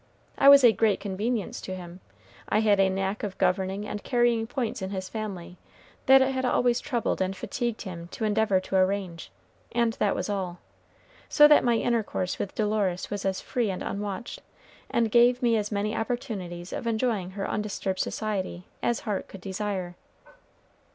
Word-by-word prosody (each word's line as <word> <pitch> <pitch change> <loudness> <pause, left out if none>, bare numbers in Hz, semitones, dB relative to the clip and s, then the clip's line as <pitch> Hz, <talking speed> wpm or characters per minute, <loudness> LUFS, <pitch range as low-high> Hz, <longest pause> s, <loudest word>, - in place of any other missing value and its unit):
I 275 - +6
was 280 -1 +9
a 240 - +8
great 215 0 +2
convenience 205 +2 -3
to 185 - -5
him. 180 0 -9 0.5
I 215 - +3
had 205 -2 +3
a 195 -1 +4
knack 195 +1 -2
of 200 -3 -5
governing 190 +2 0
and 210 - -5
carrying 240 -3 +2
points 240 -4 -3
in 190 - -3
his 190 -1 -4
family 190 -5 -6 0.5
that 265 0 +8
it 265 - 0
had 260 -1 -2
always 245 -1 +2
troubled 240 -8 -1
and 190 +1 -1
fatigued 235 +2 -3
him 170 -4 -7
to 220 - -7
endeavor 210 -2 +2
to 190 - -4
arrange, 185 -3 -1 0.4
and 235 -1 +1
that 205 - +2
was - - -2
all. 190 -4 -3 0.7
So 295 -1 +7
that 295 - +6
my 240 -1 +3
intercourse 225 -6 -1
with 195 - -4
Dolores 205 -4 -1
was 205 -1 -3
as 190 -1 -1
free 240 -5 -1
and 185 - -4
unwatched, 205 +3 -5 0.5
and 230 -2 +1
gave 245 +2 +4
me 235 -1 +4
as 210 -1 -1
many 210 +1 -1
opportunities 200 -8 -4
of 235 - -4
enjoying 220 -5 0
her 195 - -2
undisturbed 200 -2 -3
society, 195 -4 -3 0.2
as 235 - 0
heart 210 -4 -3
could 195 - -11
desire. 190 -2 -3
210 Hz, 175 wpm, -27 LUFS, 190-235 Hz, 0.7 s, was